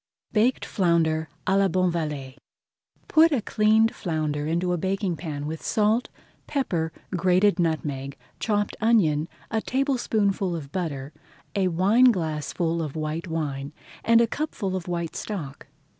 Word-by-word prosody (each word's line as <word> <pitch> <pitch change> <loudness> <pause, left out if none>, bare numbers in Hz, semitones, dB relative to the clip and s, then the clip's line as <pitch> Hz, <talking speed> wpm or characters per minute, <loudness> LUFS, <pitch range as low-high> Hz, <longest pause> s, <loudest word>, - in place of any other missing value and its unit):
BAKED 235 +4 +2
FLOUNDER 165 -4 +1 0.2
À 190 +1 +3
LA 195 - +4
BONVALLET 160 -8 -1 0.7
Put 320 +1 +5
a 280 - +2
cleaned 220 +1 +3
flounder 155 -3 -2
into 175 +2 0
a - - 0
baking 190 0 -1
pan 150 -3 -5
with 160 +1 -5
salt, 220 +3 +1 0.4
pepper, 175 - -1 0.2
grated 185 +2 +3
nutmeg, 145 -5 -1 0.2
chopped 205 -2 0
onion, 170 -10 +3 0.2
a 220 -1 +1
tablespoonful 220 -9 0
of 145 -4 -7
butter, 150 -6 -4 0.4
a 195 -2 +2
wineglassful 170 - +2
of 150 -2 -4
white 155 +2 -3
wine, 145 -3 -3 0.3
and 230 +1 +5
a - - +5
cupful 230 -7 -3
of 185 -2 -4
white 170 -2 -3
stock. 155 -10 -6
175 Hz, 130 wpm, -25 LUFS, 155-210 Hz, 0.7 s, Put